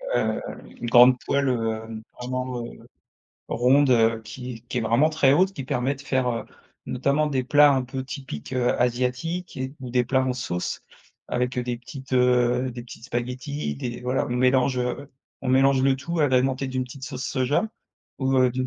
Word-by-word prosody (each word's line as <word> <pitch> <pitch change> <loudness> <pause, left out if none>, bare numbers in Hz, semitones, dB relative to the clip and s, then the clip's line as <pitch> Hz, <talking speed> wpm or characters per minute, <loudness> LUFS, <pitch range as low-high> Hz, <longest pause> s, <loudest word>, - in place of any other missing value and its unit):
hem, - - +1 0.3
heu, - - -14
une - - -5
grande 125 +1 +7
poêle, 140 -1 +1
heu, 110 -2 -2 0.2
vraiment, 125 -1 -3
heu, - - -12 0.6
ronde, 130 +3 +3
heu, 115 -1 +3
qui 125 0 -8
qui - - -2
est - - 0
vraiment 120 +8 +3
très 140 -4 +3
haute. 185 +5 +3
Qui 135 - -5
permet 130 +2 0
de 140 - -13
faire, 130 -2 0
heu, 115 -1 -2 0.4
notamment 140 +4 +1
des 135 -3 0
plats 145 +3 +6
un 130 -1 +1
peu 130 +1 -5
typiques, 130 - -7
heu, 125 -1 +1
asiatiques 125 +9 -1
et 130 +2 -4
ou 125 -2 -6
des 125 0 +2
plats 130 +1 +1
en 130 -1 -1
sauce 90 -8 -3 0.5
avec, 125 +1 -1
heu, 125 - 0
des 120 -1 -3
petites, 130 +1 -10
heu, 125 0 +3
des 120 0 -7
petites 120 -1 -12
spaghettis, 125 - -3
des 120 - -5
voilà, 125 +1 0
on 120 - -2
mélange, 130 0 +3
heu, 135 +3 -3 0.3
on 135 - -4
mélange 135 0 +4
le 135 0 +3
tout 165 +4 -3
agrémenté 130 -1 +2
d'une 130 -1 -2
petite 130 +2 -12
sauce 130 -1 -5
soja, 130 - +1 0.5
ou, 135 -1 +1
heu, 130 -1 +4
d'une 130 +1 -2
130 Hz, 195 wpm, -24 LUFS, 125-135 Hz, 0.6 s, grande